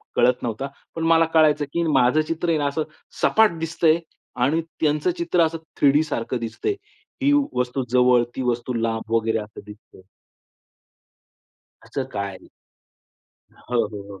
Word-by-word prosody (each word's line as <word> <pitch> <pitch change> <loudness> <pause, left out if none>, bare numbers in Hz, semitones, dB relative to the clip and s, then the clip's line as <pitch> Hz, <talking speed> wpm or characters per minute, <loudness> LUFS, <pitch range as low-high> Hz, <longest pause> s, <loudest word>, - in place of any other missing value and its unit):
कळत 125 +1 +3
नव्हता. 120 +3 -3 0.3
पण 165 - -3
मला 165 0 +5
कळायचं, 150 -2 +4
की 170 - +1
माझं 140 -1 +3
चित्र 165 +2 -2
आहे 160 - +3
ना 145 - -1
असं 145 +2 -1 0.4
सपाट 220 -6 +4
दिसतंय 165 0 +2 0.4
आणि 155 +6 +2 0.2
त्यांचं 150 +3 +2
चित्र 170 0 +1
असं 165 +1 -3 0.2
3 140 - +6
डी 150 +2 +3
सारखं 125 -5 -3
दिसतंय. 115 - -3 0.5
ही 280 - +3 0.2
वस्तू 125 +1 -1
जवळ, 125 0 +4
ती 130 - -3
वस्तू 125 0 -1
लांब, 115 -1 -2
वगैरे 115 0 +1
असं 105 0 -9
दिसतंय. 105 -2 -15 1.8
असं 135 - -4
काय 100 -1 -2
आहे? - - -15 1.3
हो, 120 -1 +2
हो, 105 -1 -8
हो. 100 - -11
135 Hz, 150 wpm, -23 LUFS, 115-160 Hz, 1.8 s, 3